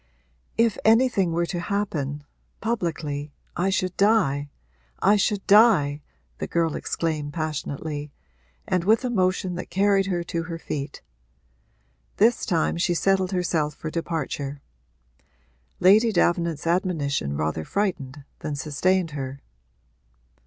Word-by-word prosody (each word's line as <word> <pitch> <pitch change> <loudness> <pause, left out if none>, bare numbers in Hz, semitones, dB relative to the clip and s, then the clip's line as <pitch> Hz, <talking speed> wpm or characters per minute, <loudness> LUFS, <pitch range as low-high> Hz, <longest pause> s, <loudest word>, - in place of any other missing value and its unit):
'If 230 -2 +2
anything 220 -5 +4
were 170 +1 +1
to 175 0 -4
happen 155 -7 -2 0.4
publicly 160 -9 -2 0.2
I 180 +3 +1
should 185 -2 -1
die, 190 -10 +2 0.5
I 205 +2 +4
should 205 0 0
die!' 200 -9 +5 0.4
the - - -3
girl 165 -2 0
exclaimed 155 -3 -2
passionately 150 -1 -4 0.6
and 185 -2 +1
with 220 +6 +3
a 250 - -1
motion 185 -3 +1
that - - -6
carried 195 0 +2
her 175 -3 -1
to 170 0 -3
her 165 0 -5
feet. 145 -3 -5 1.1
This 230 +3 +3
time 170 -3 +1
she 175 0 +1
settled 190 +1 +2
herself 165 -5 0
for 155 - -6
departure. 150 -4 -3 1.2
Lady 215 +5 +6
Davenant's 170 -4 +1
admonition 155 - 0
rather 80 +1 -1
frightened 145 - -2 0.2
than 150 - -4
sustained 165 +5 0
her. 135 -1 -5
170 Hz, 120 wpm, -24 LUFS, 145-195 Hz, 1.2 s, Lady